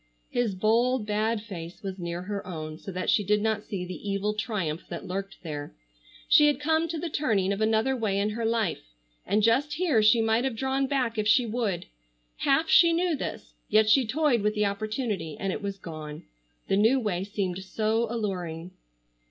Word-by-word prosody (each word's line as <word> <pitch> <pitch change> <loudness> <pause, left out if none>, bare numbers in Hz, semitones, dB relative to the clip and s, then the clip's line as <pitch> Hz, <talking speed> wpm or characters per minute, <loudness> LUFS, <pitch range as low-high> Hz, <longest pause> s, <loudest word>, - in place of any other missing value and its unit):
His 240 -5 0
bold, 230 +4 +2
bad 215 +1 0
face 180 -2 -8
was 190 -1 -5
near 170 0 -4
her 200 0 -5
own, 155 -3 -6
so 195 - -7
that 185 0 -4
she 210 - +3
did 210 +1 +2
not 220 0 0
see 185 -3 -4
the 185 +3 -6
evil 200 +1 0
triumph 195 -7 -2
that - - -6
lurked 195 +1 -5
there. 145 - -6 0.5
She 300 -1 +7
had 290 -2 +2
come 320 +2 +1
to 330 0 -4
the 340 - -3
turning 215 - +1
of 200 - -4
another 220 +4 +2
way 215 -5 -1
in 205 +1 0
her 230 +2 -4
life, 210 - -1 0.3
and 210 +2 +2
just 265 +7 +3
here 310 -9 +2
she 215 +2 +5
might 225 +1 +2
have 265 -3 -1
drawn 265 +3 0
back 250 -5 0
if 210 - 0
she 240 +3 +5
would. 220 -5 -2 0.5
Half 280 +4 +2
she 335 +1 +6
knew 345 -1 +1
this, - - -6 0.2
yet 215 0 +4
she 260 -2 +4
toyed 275 -2 +2
with 210 +1 0
the 210 0 +2
opportunity, 205 - -3
and 195 -1 -1
it - - -5
was 200 -1 -4
gone. 155 -4 -8 0.4
The 195 - +2
new 225 +6 +4
way 195 -6 -1
seemed 195 -3 -3
so 220 +4 0
alluring. 180 -7 -4
215 Hz, 195 wpm, -27 LUFS, 190-240 Hz, 0.5 s, She